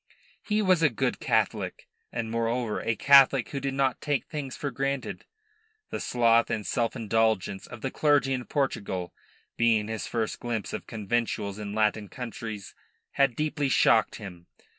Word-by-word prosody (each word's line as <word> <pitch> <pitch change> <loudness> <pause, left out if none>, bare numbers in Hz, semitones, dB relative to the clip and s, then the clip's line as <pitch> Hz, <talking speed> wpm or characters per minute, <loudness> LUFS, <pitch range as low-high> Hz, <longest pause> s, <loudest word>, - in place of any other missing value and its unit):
He 215 0 0
was 185 -4 +4
a 155 - +5
good 115 - -1
Catholic, - - -1 0.2
and, 115 -2 -3
moreover, 115 -1 -1
a 115 - 0
Catholic 135 0 +6
who 140 - -3
did 135 0 -3
not 135 -2 +1
take 145 -3 -1
things 140 -4 -5
for 140 - -3
granted. 135 +2 -3 0.7
The - - -3
sloth 115 -1 +3
and 105 -2 -2
self 115 0 -1
indulgence 110 -4 0
of 115 - -10
the 135 - -2
clergy 145 -3 +3
in 125 -2 -3
Portugal, 100 - -2 0.4
being 110 -2 +2
his 110 -1 -4
first 115 -2 -2
glimpse 115 -3 -3
of - - -5
conventuals 105 -2 -2
in 105 -1 -5
Latin 105 -1 +1
countries, 110 -4 -7 0.4
had 135 -3 +2
deeply 150 -1 -1
shocked 115 -3 +4
him. 90 -5 -10
115 Hz, 160 wpm, -27 LUFS, 110-135 Hz, 0.7 s, Catholic